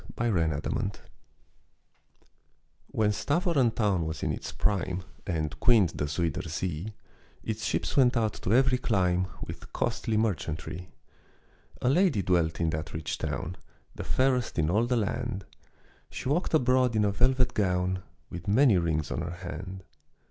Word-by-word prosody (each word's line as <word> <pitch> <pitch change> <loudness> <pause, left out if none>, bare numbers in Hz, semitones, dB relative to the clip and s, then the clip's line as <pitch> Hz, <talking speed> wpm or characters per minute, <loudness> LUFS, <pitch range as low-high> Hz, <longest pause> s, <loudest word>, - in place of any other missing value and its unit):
THE - - -12 0.2
PROUD 80 -6 +1
LADY 100 -4 -2 1.9
When 105 -1 +1
Stävoren 145 - +2
town 95 -7 +1
was 80 -2 -5
in - - +1
its - - -5
prime 95 -3 0 0.2
And 80 -3 -2
queened 110 -7 +5
the 75 - -3
Zuyder 80 +1 -1
Zee, 90 +5 -3 0.5
Its 110 0 -3
ships - - -1
went 125 -3 +5
out 110 -2 +1
to 95 - -1
every 130 +1 +4
clime 90 -6 +1 0.2
With - - -9
costly 110 -1 -1
merchantry. 90 -4 -2 0.9
A 125 - +4
lady 150 - +3
dwelt 85 -3 +1
in 80 -1 +1
that 75 -1 -4
rich 80 -1 -3
town, 90 +3 -3 0.4
The - - -6
fairest 130 -2 +1
in 80 0 +2
all 110 +5 +2
the 125 0 +1
land; 115 -2 -2 0.6
She - - -6
walked 165 +3 +1
abroad 125 -3 +3
in 105 -1 +3
a 100 - +2
velvet 125 +3 +2
gown, 90 -2 +1 0.3
With 90 0 -7
many 110 -1 +5
rings 80 -3 -1
on - - -1
her 85 - -3 0.2
hand. 95 +3 -6
100 Hz, 150 wpm, -28 LUFS, 85-120 Hz, 1.9 s, queened